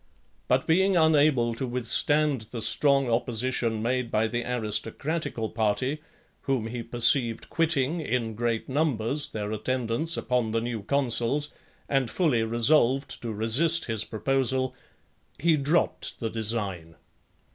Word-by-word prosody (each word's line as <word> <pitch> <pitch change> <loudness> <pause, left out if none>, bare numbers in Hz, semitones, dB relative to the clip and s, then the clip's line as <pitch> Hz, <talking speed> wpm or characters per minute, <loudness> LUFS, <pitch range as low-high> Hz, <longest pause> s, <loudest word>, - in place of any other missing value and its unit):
But 130 +1 +2
being 190 +3 +3
unable 145 -7 +3
to 130 +3 -4
withstand 125 +1 +1
the 115 -2 -5
strong 135 +4 +2
opposition 115 -1 -1
made 125 0 -1
by 110 0 +1
the 120 +1 -3
aristocratical 115 +3 -3
party, 115 +7 -1 0.4
whom 135 -5 0
he 120 +1 -5
perceived 115 0 +1
quitting, 160 -1 +1
in 120 -6 -2
great 115 0 -2
numbers, 140 -1 0
their 105 -1 -5
attendance 125 +8 0
upon 125 -3 -1
the 115 - +1
new 115 -2 -4
consuls, 140 +3 0 0.3
and 135 -4 0
fully 140 -4 +1
resolved 120 +4 +2
to 115 - -4
resist 130 +11 +2
his 110 -2 -1
proposal, 130 +3 0 0.6
he 165 -1 +3
dropped 150 +4 -1
the 115 -3 -3
design. 100 -7 -3
120 Hz, 125 wpm, -26 LUFS, 115-140 Hz, 0.6 s, being